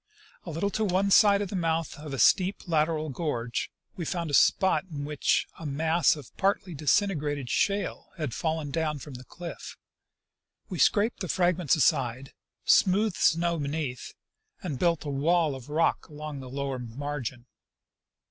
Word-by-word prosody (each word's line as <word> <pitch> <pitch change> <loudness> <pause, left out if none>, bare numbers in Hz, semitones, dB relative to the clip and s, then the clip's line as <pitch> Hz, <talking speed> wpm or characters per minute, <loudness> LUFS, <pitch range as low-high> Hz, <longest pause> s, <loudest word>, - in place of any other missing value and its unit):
A - - -6
little 165 +6 -1
to 220 - -1
one 195 0 +1
side 205 -1 +6
of 200 - -6
the - - -3
mouth 165 -2 -1
of 150 -1 -8
a 135 - -3
steep 185 +7 +3
lateral 155 -1 +1
gorge 125 -5 -3 0.3
we 180 - -4
found 170 -1 -3
a - - -7
spot 190 +6 +4
in 145 -3 -5
which 150 -1 +1
a 165 - -8
mass 160 +5 +2
of 145 -5 -12
partly 195 -2 0
disintegrated 150 - 0
shale 200 0 0
had 150 -8 -3
fallen 160 -3 -2
down 155 -1 -1
from 145 0 -10
the 125 0 -9
cliff. 170 +6 -9 0.9
We - - -5
scraped 215 +2 +3
the 185 - -3
fragments 175 -3 +2
aside, 130 -3 +1 0.3
smoothed 200 +1 +3
the - - -6
snow 170 0 +2
beneath, 140 -3 -4 0.5
and 150 -9 -4
built 170 -3 +1
a - - -3
wall 155 +2 +2
of 130 0 -9
rock 160 +3 +1
along 150 -1 -7
the 130 -1 -9
lower 135 0 -3
margin. 125 0 -5
155 Hz, 165 wpm, -27 LUFS, 140-175 Hz, 0.9 s, side